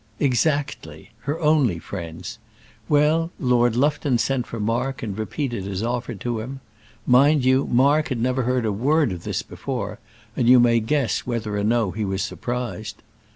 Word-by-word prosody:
"Exactly; 140 +2 -1
her 145 +4 -2
only 150 - +3
friends. 85 +5 -7 0.5
Well, 155 +3 +3
Lord 120 -2 +2
Lufton 140 -1 +1
sent 125 +1 -1
for 115 - -6
Mark 120 +5 -1
and 105 -4 -4
repeated 110 -1 -3
his 100 +1 -3
offer 120 +1 -2
to 120 -2 -3
him. 130 +5 -6 0.5
Mind 140 +2 +4
you, 130 +1 +3
Mark 140 +5 +3
had 130 -4 -3
never 130 +2 +1
heard 125 -1 0
a 110 - +1
word 140 +5 +2
of 90 -2 -6
this - - -2
before, - - -5 0.4
and 120 -2 +2
you 125 0 +8
may 120 -1 +4
guess 125 +3 -1
whether 115 -4 -2
or 100 - -1
no 110 -2 +1
he 105 +5 -3
was 95 -1 -1
surprised. 120 -1 -5
125 Hz, 165 wpm, -23 LUFS, 110-135 Hz, 0.5 s, you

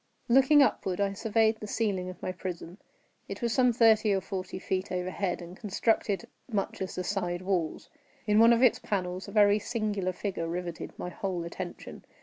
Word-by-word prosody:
Looking 270 +4 +6
upward, 195 -6 -1
I 200 -1 +1
surveyed 220 +1 +1
the 210 - -7
ceiling 200 -4 -1
of 185 - -11
my - - -1
prison. 180 0 -7 0.5
It - - -6
was 235 -1 +1
some 250 -1 +4
thirty 220 -2 +4
or - - +1
forty 190 -1 -5
feet 190 0 -3
overhead, 185 0 -2
and 175 +1 -10
constructed 210 +1 0 0.3
much 200 -3 -2
as 190 - -4
the 180 - -2
side 180 -2 -2
walls. 180 -5 -1 0.4
In 210 0 +3
one 230 +1 +7
of 235 +2 +4
its 250 - +5
panels 185 -2 -3
a - - -8
very 205 -1 +5
singular 205 -4 -2
figure 180 -2 -4
riveted 175 0 -5
my 180 - -5
whole 180 -1 -3
attention. 175 +1 -7
195 Hz, 180 wpm, -29 LUFS, 180-220 Hz, 0.5 s, one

